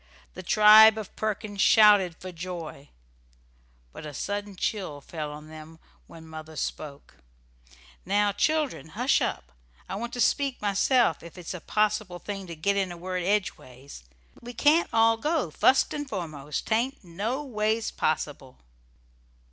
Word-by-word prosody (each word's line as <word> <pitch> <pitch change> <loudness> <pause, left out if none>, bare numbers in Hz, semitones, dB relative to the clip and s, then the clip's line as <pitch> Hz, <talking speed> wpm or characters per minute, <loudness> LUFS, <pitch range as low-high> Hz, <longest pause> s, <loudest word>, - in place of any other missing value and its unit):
The - - -8
tribe 215 +3 +7
of 215 -3 -7
Perkins 215 -1 -3
shouted 205 -5 +5
for 185 - -8
joy, 170 -4 -8 1.0
but - - -10
a 150 -2 -8
sudden 205 0 -4
chill 185 -6 -3
fell 150 0 -6
on 150 +1 -10
them 155 +1 -12 0.3
when 160 -1 -13
mother 160 0 -10
spoke: 145 -1 -6 0.9
"Now, 205 +2 +1
children, 310 - -1
hush 250 +3 +2
up! - - -3 0.4
I - - -6
want 235 +4 -4
to 245 - -5
speak 275 +3 +1
myself, 205 - +2
ef 170 +2 -13
it's 180 0 -7
a 180 - -7
possible 210 -3 -1
thing 195 0 -7
to 170 - -7
git 200 +6 0
in 190 -2 -1
a 175 - -8
word 180 +1 -4
edgeways. 140 - -3 0.4
We 245 0 -9
can't 315 +4 +3
all 225 0 +4
go, 300 - -1
fust 260 - +3
and 290 -2 -5
foremost. 155 - -5
'Tain't 240 +4 -1
noways 220 +4 -2
possible." 145 -4 -3
195 Hz, 145 wpm, -26 LUFS, 160-220 Hz, 1.0 s, tribe